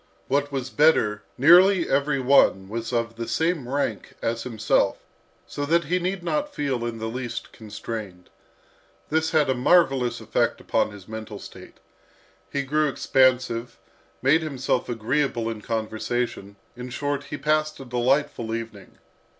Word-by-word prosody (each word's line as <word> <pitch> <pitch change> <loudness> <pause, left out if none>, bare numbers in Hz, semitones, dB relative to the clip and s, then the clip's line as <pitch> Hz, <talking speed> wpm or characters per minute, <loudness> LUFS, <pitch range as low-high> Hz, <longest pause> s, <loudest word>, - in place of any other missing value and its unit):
What 145 +1 0
was 135 -2 -4
better, 110 -9 +3 0.2
nearly 175 +6 +6
every 140 +1 +1
one 125 -7 +4
was 115 +3 -4
of 115 -1 -2
the 115 -1 -4
same 155 +2 0
rank 130 -7 -2
as 115 0 -2
himself, 110 -3 +1 0.5
so 145 - -5
that 170 +2 +3
he 180 +5 0
need 180 0 -2
not 295 - -2
feel 135 -5 -1
in 115 -1 -5
the 110 - -5
least 120 +1 -5
constrained. 105 -4 -8 0.8
This 160 +1 +1
had 155 -3 +3
a 130 - +2
marvellous 130 -2 +3
effect - - 0
upon - - 0
his 100 -3 -12
mental 110 -1 -7
state. - - -12 0.7
He 140 - -1
grew 150 +2 +1
expansive, 125 -3 +1 0.5
made 150 +5 +4
himself 135 -5 -1
agreeable 120 0 -1
in 110 -2 -7
conversation, 110 -1 -3 0.2
in 125 +1 -7
short, 145 +2 -3
he 145 - -6
passed 155 +2 0
a 135 - -8
delightful 125 -1 0
evening. 115 -4 -8
130 Hz, 145 wpm, -24 LUFS, 115-145 Hz, 0.8 s, nearly